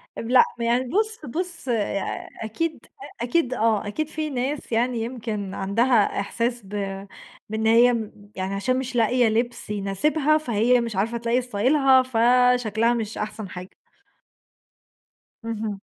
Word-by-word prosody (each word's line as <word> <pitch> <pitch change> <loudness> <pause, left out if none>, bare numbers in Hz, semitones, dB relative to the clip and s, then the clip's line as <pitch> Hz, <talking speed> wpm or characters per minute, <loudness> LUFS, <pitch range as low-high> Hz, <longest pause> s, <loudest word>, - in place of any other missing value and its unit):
لأ، 245 +2 +4 0.2
يعني 235 +2 +1
بُص، 435 - -1
بُص، 345 +3 -5
يع 210 -4 -2 0.2
أكيد، 315 +9 -3 0.3
أ - - -2
أكيد، 255 +1 +1
آه 220 -3 +1
أكيد 310 +9 -2
في 310 0 -4
ناس 270 +2 -3
يعني 235 +1 +1
يمكن 220 -5 -4
عَندها 215 +3 +2
إحساس 235 +4 -2
ب - - -15 0.8
بإن 220 +1 -1
هي 235 +2 +6
م 220 -3 -3 0.2
يعني 190 +1 -3
عشان 255 +6 0
مش 260 -1 -5
لاقية 240 +1 +3
لِبس 235 +1 -1
يناسبها، 270 +10 +1
فهي 245 -3 +2
مش 230 -3 -4
عارفة 220 +5 0
تلاقي 235 +2 0
ستايلها، 260 +4 +3
فشكْلها 240 -2 +3
مش 225 -2 -3
أحسَن 215 -1 -5
حاجة. 180 +1 -8 1.8
اهم. 215 -3 -4
235 Hz, 135 wpm, -24 LUFS, 215-255 Hz, 1.8 s, هي